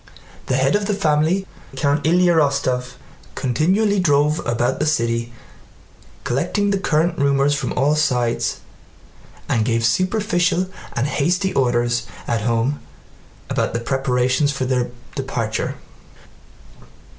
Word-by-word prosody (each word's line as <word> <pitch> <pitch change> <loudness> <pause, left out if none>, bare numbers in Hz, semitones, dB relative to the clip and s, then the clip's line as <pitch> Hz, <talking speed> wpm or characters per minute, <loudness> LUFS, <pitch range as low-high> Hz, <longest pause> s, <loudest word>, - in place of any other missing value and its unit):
The 130 - +1
head 135 +4 +2
of 205 -1 0
the 210 - 0
family, 160 +1 +1 0.3
Count 145 +1 +1
Ilyá 175 +2 +4
Rostóv, 135 -4 +1 0.4
continually 190 - +1
drove 150 -2 +2
about 120 0 0
the 155 - 0
city 115 -4 0 0.9
collecting 180 +10 0
the 200 - 0
current 170 -1 +1
rumors 140 0 +3
from 140 - -2
all 145 +4 +2
sides 125 -6 0 0.9
and 115 - +1
gave 115 0 0
superficial 185 - +1 0.3
and 120 - 0
hasty 180 +7 0
orders 120 -1 +1 0.2
at 115 -3 0
home 115 +5 0 0.7
about - - -1
the - - 0
preparations 130 +2 +1
for 135 -2 -2
their 125 -1 0 0.2
departure. 115 -5 -3
140 Hz, 120 wpm, -20 LUFS, 125-170 Hz, 0.9 s, Ilyá